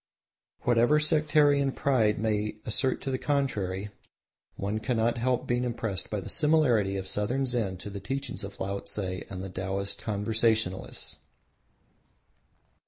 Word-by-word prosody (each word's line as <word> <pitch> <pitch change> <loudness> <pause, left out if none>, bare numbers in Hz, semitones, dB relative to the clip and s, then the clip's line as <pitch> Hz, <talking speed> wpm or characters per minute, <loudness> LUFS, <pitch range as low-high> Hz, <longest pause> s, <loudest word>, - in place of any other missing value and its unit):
Whatever 120 +5 +4
sectarian 145 -2 +3
pride 120 -7 +2
may 105 -1 0
assert 130 +4 +1
to 135 - -3
the 130 - -1
contrary 105 -9 -1 0.6
one 100 +2 -2
cannot 115 0 +1
help 125 +1 +1
being 120 0 0
impressed 115 -6 -3
by - - -2
the - - -7
similarity 125 -11 +3
of 95 - -4
Southern 120 +8 0
Zen 115 -7 0
to 100 - -7
the 100 - -5
teachings 135 +5 -4
of 100 - -8
Laotse 100 +2 -3
and 95 -1 -4
the 95 - -5
Taoist 100 +2 -3
Conversationalists. 110 -2 0
110 Hz, 130 wpm, -28 LUFS, 100-130 Hz, 0.6 s, Whatever